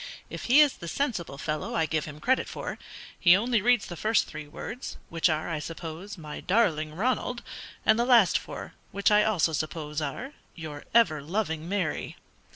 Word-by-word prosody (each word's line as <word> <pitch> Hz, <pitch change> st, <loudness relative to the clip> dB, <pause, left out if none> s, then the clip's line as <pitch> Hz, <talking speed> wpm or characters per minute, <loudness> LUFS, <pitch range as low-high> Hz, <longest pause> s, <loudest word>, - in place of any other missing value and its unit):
If -, -, -6 dB
he 265 Hz, +5 st, +7 dB
is 290 Hz, -3 st, +4 dB
the 170 Hz, -, -8 dB
sensible 180 Hz, -, -2 dB
fellow 150 Hz, +1 st, -3 dB
I 165 Hz, -, +2 dB
give 155 Hz, 0 st, -1 dB
him 150 Hz, -1 st, -9 dB
credit 260 Hz, +9 st, +1 dB
for, -, -, -5 dB, 0.4 s
he 175 Hz, +1 st, +7 dB
only 230 Hz, +1 st, +1 dB
reads 240 Hz, 0 st, +3 dB
the 175 Hz, -, -7 dB
first 220 Hz, +6 st, +2 dB
three 150 Hz, -1 st, -8 dB
words, 235 Hz, -, -7 dB
which 165 Hz, +1 st, +2 dB
are, 155 Hz, 0 st, -1 dB
I 165 Hz, -3 st, -2 dB
suppose, 165 Hz, +5 st, -7 dB
'my 155 Hz, -3 st, -7 dB
darling 160 Hz, -7 st, +1 dB
Ronald' 245 Hz, +4 st, -1 dB, 0.4 s
and 220 Hz, +1 st, +5 dB
the 240 Hz, -, +3 dB
last 235 Hz, -7 st, +5 dB
four, -, -, -8 dB, 0.2 s
which 200 Hz, +1 st, +2 dB
I 210 Hz, 0 st, +6 dB
also 175 Hz, -7 st, +2 dB
suppose 155 Hz, 0 st, -3 dB
are 265 Hz, -, -4 dB, 0.2 s
'your 155 Hz, -3 st, -8 dB
ever 165 Hz, -11 st, +5 dB
loving 160 Hz, -1 st, -2 dB
Mary.'" 190 Hz, -5 st, -2 dB
175 Hz, 180 wpm, -28 LUFS, 155-225 Hz, 0.4 s, he